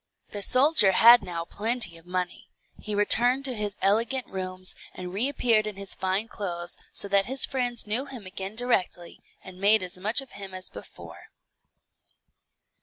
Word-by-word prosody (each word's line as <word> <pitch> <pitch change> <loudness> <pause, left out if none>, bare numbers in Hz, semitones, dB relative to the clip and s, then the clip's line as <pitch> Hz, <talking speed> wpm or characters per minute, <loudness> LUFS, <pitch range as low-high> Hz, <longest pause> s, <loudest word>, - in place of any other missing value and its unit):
The 205 - -6
soldier 255 -3 +4
had 235 +5 +7
now 170 -2 -6
plenty 220 -2 +1
of 165 +1 -18
money; 180 -1 -5 0.3
he 210 -1 -5
returned 245 +6 +3
to 260 - 0
his 210 -3 -4
elegant 230 +6 +1
rooms, 185 -1 -3 0.2
and 180 0 -8
reappeared 230 -1 +1
in 210 - -6
his 195 0 -5
fine 190 +4 -2
clothes, 175 -5 -5 0.2
so - - 0
that 195 0 +2
his 265 +1 +5
friends 245 -3 -2
knew 225 +6 -2
him 255 -7 -10
again 190 +2 -7
directly, 195 -7 -2 0.2
and 185 0 -13
made 210 +1 +4
as 180 0 -7
much 215 +7 +1
of 270 -2 -9
him 195 -1 -9
as 185 0 -4
before. - - -12
205 Hz, 165 wpm, -26 LUFS, 185-240 Hz, 0.3 s, had